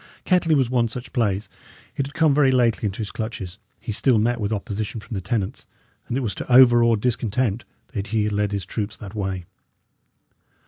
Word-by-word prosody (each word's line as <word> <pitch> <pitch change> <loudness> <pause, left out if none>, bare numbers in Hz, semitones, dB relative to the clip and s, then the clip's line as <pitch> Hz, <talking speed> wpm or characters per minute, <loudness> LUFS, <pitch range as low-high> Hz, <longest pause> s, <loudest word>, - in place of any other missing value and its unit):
Kettley 175 -3 +3
was 135 -4 +3
one 120 -1 +1
such 120 +2 -7
place; 105 -5 0 0.5
it 140 -2 -1
had 145 - -13
come 160 -4 +4
very 140 -1 +4
lately 120 -4 +2
into 95 - -5
his 110 -3 -4
clutches; 105 -4 -5 0.2
he - - -5
still 120 +3 +3
met 115 +2 +1
with 105 +1 -1
opposition 110 +1 -3
from 110 - -10
the 95 - -2
tenants; 105 -2 -3 0.4
and 120 - -2
it - - -1
was 110 -6 -2
to 125 - -6
overawe 120 -2 +7
discontent 115 0 -1 0.3
that 100 -3 -3
he 110 0 0
had 105 0 -1
led 105 0 0
his 100 -2 -2
troops 105 -2 -4
that 100 -4 -9
way. 95 -4 -3
115 Hz, 195 wpm, -23 LUFS, 100-125 Hz, 0.5 s, overawe